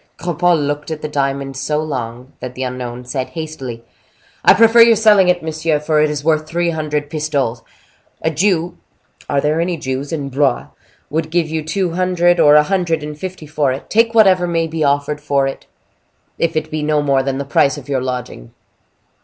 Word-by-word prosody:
Cropole 175 0 +1
looked 145 0 -3
at 155 -1 -5
the - - -1
diamond 140 -2 -2
so 135 +3 -2
long, 125 -4 -5
that 125 0 -7
the 130 - -4
unknown 125 -1 -5
said, 130 +1 -3
hastily: 135 -8 -7 0.6
"I - - +7
prefer 230 +1 +6
your 230 0 +7
selling 210 -4 +5
it, 175 -2 +1
monsieur; 160 -1 -1
for 150 0 +1
it 155 - +3
is 150 -1 -4
worth 155 -1 +1
three 170 0 0
hundred 150 -2 -2
pistoles. 145 -6 -2 0.6
A 160 - +1
Jew—are 170 -4 -2
there 150 +3 +1
any 175 0 -1
Jews 135 0 -4
in 145 -4 -3
Blois?—would 145 +3 -3
give 165 0 +1
you 160 -1 -2
two 175 +3 -1
hundred 175 0 +2
or 150 0 +6
a 150 - +7
hundred 175 -3 -1
and 150 0 -6
fifty 185 0 -7
for 145 -2 0
it—take 230 - 0
whatever 190 -5 +5
may 165 -1 0
be 160 -1 -3
offered 145 +1 0
for 140 -2 +1
it, 135 - -6 0.7
if 165 -1 0
it 155 0 -3
be 155 0 -2
no 150 0 +1
more 135 -2 +2
than 135 0 -2
the 140 - -4
price 140 +1 +2
of 145 - -10
your 135 -2 -1
lodging. 125 - -6
150 Hz, 185 wpm, -17 LUFS, 140-170 Hz, 0.7 s, I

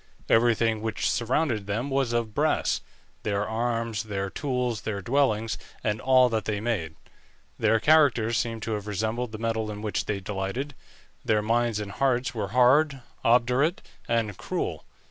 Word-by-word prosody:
Everything 115 -1 +3
which 110 0 -1
surrounded 120 -3 0
them 115 +7 -2
was 135 -3 +1
of 115 -2 -1
brass; - - +1 0.4
their 105 -1 -1
arms, 115 -1 -1
their 100 -2 -3
tools, 125 -6 -2
their 105 -2 -3
dwellings, 115 0 +1 0.2
and 105 0 -1
all 130 -1 +5
that 110 -2 -1
they 105 -2 -1
made. 100 -9 -2 0.6
Their 110 0 +3
characters 130 -6 +4
seem 115 -1 -1
to 110 - -3
have 105 -1 -3
resembled 110 +4 -2
the 110 - -6
metal 110 -1 -1
in 105 0 -6
which 105 - -1
they 100 -2 -2
delighted; 100 +9 -4 0.5
their 105 -1 +2
minds 115 0 +1
and 105 -1 -5
hearts 130 0 0
were 105 -4 -2
hard, 130 +6 +4 0.2
obdurate, 125 +8 +3 0.2
and 115 -4 0
cruel. - - -3
115 Hz, 155 wpm, -26 LUFS, 105-125 Hz, 0.6 s, all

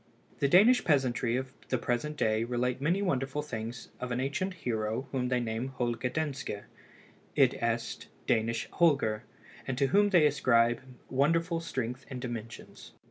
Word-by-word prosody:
The 140 - +3
Danish 210 - +6
peasantry 130 -5 +2
of 130 +1 -3 0.2
the 130 - +2
present 125 +6 -2
day 110 -2 +2
relate 125 +2 -1
many 175 +7 +1
wonderful 140 -4 -1
things 115 -4 -6
of 125 -1 -4
an 120 - 0
ancient 165 +8 -2
hero 115 -3 -2
whom 130 -2 0
they 125 -1 +2
name 115 +1 -2
Holger 125 -2 -2
Danske, 135 -7 -3 0.7
i.e. - - +3 0.5
Danish 115 +1 +1
Holger, 135 -10 +2 0.4
and 130 -2 -2
to 140 - +3
whom 205 +1 +5
they 175 -6 +5
ascribe 120 -5 +3 0.3
wonderful 165 +5 +2
strength 130 -5 -4
and 130 -2 -5
dimensions. 115 -2 -7
130 Hz, 145 wpm, -30 LUFS, 120-150 Hz, 0.7 s, Danish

